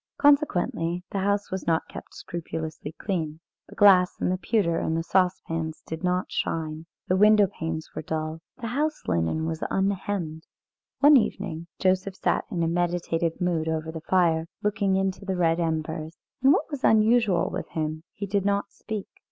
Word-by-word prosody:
Consequently, 180 - +2
the 200 - -1
house 200 +1 0
was 190 0 -4
not 165 -1 +1
kept - - -10
scrupulously 160 -3 -5
clean. 160 -5 -3 0.3
The - - -12
glass 185 -3 +5
and - - +1
the 185 - 0
pewter 190 -6 +1
and 160 - -1
the 165 - -1
saucepans 165 -3 0
did 160 +2 -6
not 180 0 0
shine. 160 0 -3 0.2
The 185 - +2
window 210 +1 +6
panes 160 -3 -4
were - - -4
dull. 155 +1 -4 0.2
The 230 -3 -4
house 305 +3 -1
linen 85 - 0
was 160 0 -3
unhemmed. 190 -4 -2 0.5
One 290 0 +8
evening 170 -7 -2
Joseph 185 +1 +1
sat - - 0
in 170 -3 -1
a - - +1
meditative 170 -1 0
mood 170 -3 0
over 160 0 -2
the 160 0 -7
fire, 165 -2 +2 0.2
looking 200 -2 +1
into 190 +1 -1
the 190 -1 -2
red 165 -1 +2
embers, 160 0 -2 0.3
and 265 +2 +6
what 315 - +1
was 285 -3 -5
unusual 220 -4 +4
with - - -4
him, 155 0 -3
he 200 - -5
did 200 0 0
not 200 0 0
speak. 215 -3 -5
175 Hz, 170 wpm, -26 LUFS, 160-200 Hz, 0.5 s, One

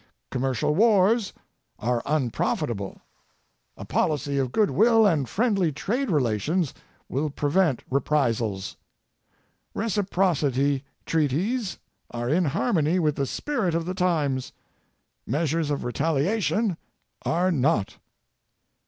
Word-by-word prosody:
Commercial 130 +2 0
wars 210 +2 +3 0.5
are 120 +2 0
unprofitable. 120 -6 -1 0.7
A - - -8
policy 145 -2 0
of 130 -2 -1
good 210 - +2
will 225 0 +5
and 155 - +2
friendly 200 -7 +1
trade 245 - -2
relations 145 - 0 0.3
will 150 +3 -1
prevent 145 0 +1
reprisals. 115 -8 0 1.0
Reciprocity 170 - +1 0.2
treaties 175 - 0 0.3
are 120 0 -3
in 175 +3 +3
harmony 155 +4 +1
with 155 -5 +1
the 140 -1 -1
spirit 220 - -1
of 165 0 -1
the 185 - -3
times; 155 -8 0 0.7
measures 155 +3 0
of 145 - -1
retaliation 170 - 0 0.5
are 180 +3 +1
not. 140 - 0
155 Hz, 100 wpm, -25 LUFS, 135-190 Hz, 1.0 s, will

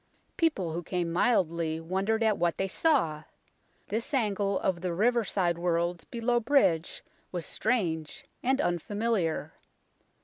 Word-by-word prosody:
People 195 - 0
who 170 - -2
came 175 0 -2
mildly 170 -6 +1
wondered 195 +7 0
at 215 -2 +2
what 170 -1 +1
they 195 - 0
saw. 185 - +1 0.6
This 235 +7 -2
angle 200 -5 +1
of 185 -3 0
the 180 -2 -2
riverside 200 -5 +1
world 170 0 0
below 240 +1 +1
bridge 220 - +2 0.3
was 175 -3 -3
strange 175 -10 -1 0.2
and 265 +2 +1
unfamiliar. 200 - -1
190 Hz, 125 wpm, -29 LUFS, 170-230 Hz, 0.6 s, at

